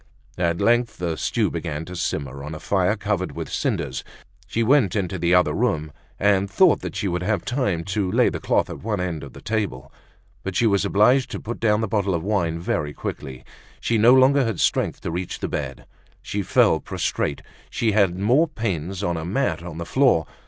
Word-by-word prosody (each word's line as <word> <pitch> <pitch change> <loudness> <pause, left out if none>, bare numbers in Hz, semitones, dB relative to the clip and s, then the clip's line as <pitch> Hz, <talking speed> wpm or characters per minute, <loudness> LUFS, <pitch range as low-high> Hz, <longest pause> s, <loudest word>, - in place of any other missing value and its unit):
At 85 -1 +1
length 120 0 +2
the 85 -2 -2
stew - - 0
began 75 +2 -4
to 90 - -8
simmer 70 -5 -3
on 75 +2 -6
a - - -7
fire 100 +3 +1
covered 100 -3 -2
with - - -6
cinders. 65 0 -2 0.4
She 115 - 0
went 120 -6 +3
into 95 -2 -2
the 85 +2 +3
other 90 - +3
room, 75 -1 0 0.3
and 100 -1 +2
thought 95 - +3
she 100 - -1
would 90 -1 -1
have 105 +3 -1
time 110 -10 -1
to 95 0 -1
lay - - +4
the - - -5
cloth - - +1
at - - -7
one 105 -1 -2
end 90 -4 -3
of 70 - -10
the - - -13
table. 100 - -3 0.5
But 95 -1 -5
she 120 - +3
was 100 -3 +2
obliged 125 +6 +3
to - - -5
put 120 +2 -6
down 105 -1 +2
the 110 - 0
bottle 100 -3 0
of 80 - -3
wine 90 -5 0
very 75 -3 -2
quickly; 65 -1 -6 0.3
she 115 -2 0
no 120 +4 +7
longer 135 +1 +5
had 115 -7 -2
strength - - +1
to - - -4
reach 90 +2 -4
the - - -3
bed; - - -5 0.4
she 100 - -2
fell - - +3
prostrate, 70 - -2
and - - -26 0.2
she 115 - 0
had 100 -4 +2
more 125 - +3
pains 95 - -3
on 85 -3 0
a 80 - -4
mat 85 -3 -1
on 85 -2 -8
the 85 - -4
floor. 125 - +3
95 Hz, 210 wpm, -23 LUFS, 85-110 Hz, 0.5 s, no